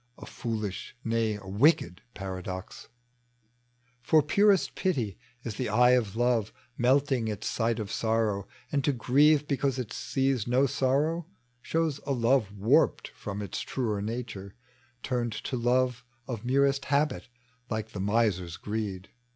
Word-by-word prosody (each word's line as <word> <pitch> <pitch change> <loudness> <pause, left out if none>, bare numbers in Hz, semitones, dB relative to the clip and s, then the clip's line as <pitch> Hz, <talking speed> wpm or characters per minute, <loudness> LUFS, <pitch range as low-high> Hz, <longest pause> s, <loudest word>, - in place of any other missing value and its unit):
A - - -10
foolish, 110 -2 -4
nay, 115 -1 0
a 105 -1 -10
wicked 100 - +2
paradox! 95 -1 -6 1.1
For 155 +5 +4
purest 200 +5 +3
pity 125 - -1 0.2
is 110 -3 -5
the - - -2
eye 125 +4 +5
of 115 -5 +2
love 120 -3 +1 0.2
Melting 130 -2 +2
at 105 -1 -5
sight 115 -1 0
of 105 -2 -4
sorrow; 110 -3 0 0.2
and 140 -2 +1
to 145 - +2
grieve 145 +5 +4
Because 140 -1 0
it 120 -4 -4
sees 135 -4 0
no 125 +3 +3
sorrow, 145 +6 0 0.3
shows 160 -2 -1
a 140 - +1
love 120 -3 +2
Warped 105 +4 +3
from 105 0 -6
its 100 - -4
truer 110 -6 -2
nature, 105 -3 -5 0.5
turned 120 -3 -1
to 130 - -4
love 125 +1 +1 0.2
<tf 120 -4 -5
merest 135 +2 +2
habit, 140 -1 0 0.4
like 110 -1 -3
the 100 - -6
miser's 100 -4 0
greed. 105 -3 -4
120 Hz, 140 wpm, -28 LUFS, 105-135 Hz, 1.1 s, eye